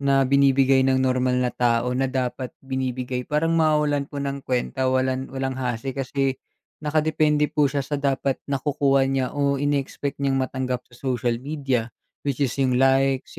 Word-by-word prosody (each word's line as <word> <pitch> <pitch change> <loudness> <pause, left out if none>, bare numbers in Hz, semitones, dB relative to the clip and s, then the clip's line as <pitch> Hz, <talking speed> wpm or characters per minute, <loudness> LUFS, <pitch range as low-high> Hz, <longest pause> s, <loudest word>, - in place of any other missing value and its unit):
na 135 -1 +3
binibigay 135 0 +4
ng 135 0 +3
normal 130 -1 +1
na 125 -1 0
tao 120 0 +1
na 130 +1 0
dapat 130 -1 -3
binibigay, 130 -1 -3
parang 155 +2 +1
mawawalan 150 -3 +2
po 145 - -9
ng 140 0 -3
kuwenta, 130 +1 -1
walang 130 0 0
walang 135 0 -3
hasi 125 0 -3
kasi 135 0 -1 0.4
nakadepende 150 -1 +1
po 150 - +3
siya 140 +1 -1
sa 145 +2 -2
dapat 135 -1 0
nakukuha 140 0 +2
niya 135 -1 0
o 140 -1 +1
in-expect 145 0 -1
niyang 135 -1 +1
matanggap 130 -1 -2
sa 120 - -19
social 125 -2 -1
media. 135 -5 -2 0.3
Which 140 0 -1
is 130 -3 0
yung 130 -2 +2
likes, 135 0 +2
135 Hz, 160 wpm, -23 LUFS, 130-140 Hz, 0.4 s, binibigay